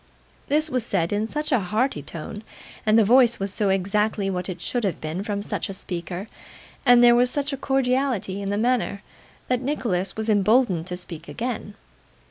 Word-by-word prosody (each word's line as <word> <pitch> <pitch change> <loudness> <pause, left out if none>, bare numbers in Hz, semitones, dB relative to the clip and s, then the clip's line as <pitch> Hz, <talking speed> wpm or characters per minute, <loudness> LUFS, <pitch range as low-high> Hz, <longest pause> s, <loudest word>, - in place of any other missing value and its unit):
This 305 +2 +3
was 255 -2 +1
said 190 -5 -1
in 210 +2 0
such 300 +5 -3
a 255 - +4
hearty 215 - -1
tone, 165 +8 -7 0.5
and 215 +1 +5
the 225 - +5
voice 240 +1 +5
was 195 0 -2
so 205 -1 0
exactly 195 +1 0
what 180 0 -3
it 185 - -5
should 245 -2 -2
have 190 -6 -1
been 155 +4 -4
from 205 -1 -3
such - - -3
a 195 - -4
speaker, 175 +2 -5 0.6
and 245 0 +7
there 240 0 +8
was 245 +1 +4
such 285 +1 -1
a - - 0
cordiality 255 -7 0
in 200 - -3
the 205 - 0
manner, 230 -3 0 0.4
that 250 -1 0
Nicholas 230 -9 -1
was 220 0 -2
emboldened 205 -4 +3
to 180 -1 -4
speak 170 -2 -8
again. 230 -3 -4
210 Hz, 190 wpm, -24 LUFS, 190-250 Hz, 0.6 s, there